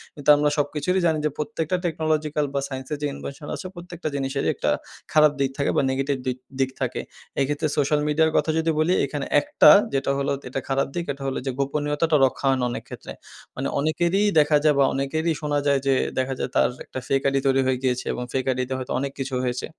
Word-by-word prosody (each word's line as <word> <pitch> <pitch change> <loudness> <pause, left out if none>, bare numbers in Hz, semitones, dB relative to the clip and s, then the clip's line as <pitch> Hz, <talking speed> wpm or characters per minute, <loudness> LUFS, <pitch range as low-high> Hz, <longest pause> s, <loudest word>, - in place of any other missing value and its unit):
কিন্তু 145 0 -2
আমরা 150 0 +2
সবকিছুরই 150 +6 0
জানি 160 -2 +3
যে, - - +3
প্রত্যেকটা 165 0 -2
টেকনোলজিক্যাল 155 -2 0
বা 140 - +1
সাইন্স 130 -1 -6
এর - - -2
যে 145 - 0
ইনভেনশন 145 +2 -8
আছে, 190 - -8
প্রত্যেকটা 175 -2 -7
জিনিসেরই 135 0 -1
একটা - - -1 0.4
খারাপ 150 -1 +6
দিক 135 -1 +2
থাকে 140 - +1
বা - - +5
নেগেটিভ 135 +1 0
দিক, 125 0 -1 0.2
দিক 130 0 +2
থাকে। - - -1 0.4
এক্ষেত্রে 145 +3 0
সোশ্যাল 150 +1 +2
মিডিয়ার 160 +1 +3
কথা - - +1
যদি 160 0 +1
বলি, 170 +4 +3
এখানে 145 0 -4 0.2
একটা 295 +1 +6 0.2
যেটা 135 0 +1
হলো 140 0 -1 0.2
এটা 135 - -2
খারাপ 135 0 +1
দিক, 170 -1 -2
এটা 135 0 -10
হলো 135 - -2
যে 135 - 0
গোপনীয়তাটা 150 +3 0
রক্ষা 130 - -2
হয় 135 - +3
না 125 - +1
অনেক - - -5
ক্ষেত্রে। - - -9 0.4
মানে - - -2
অনেকেরই 170 +6 +1 0.2
দেখা 150 0 +4
যায় 150 -2 +4
বা - - +6
অনেকেরই 160 +5 0
শোনা 145 -1 0
যায় 140 -1 +3
যে, 135 - +4 0.2
দেখা 130 +1 0
যায় - - -2
তার - - +4 0.2
একটা 130 - -6
ফেক 135 0 +2
আইডি 135 0 +2
তৈরি 135 0 +3
হয়ে 130 -1 +2
গিয়েছে 125 -1 0
এবং 125 - -4
ফেক 130 -1 0
আইডিতে 130 +1 -2
হয়তো 130 - -6
অনেক 140 0 -2
কিছু 135 -1 -3
হয়েছে। 125 0 -2
145 Hz, 215 wpm, -24 LUFS, 135-155 Hz, 0.4 s, খারাপ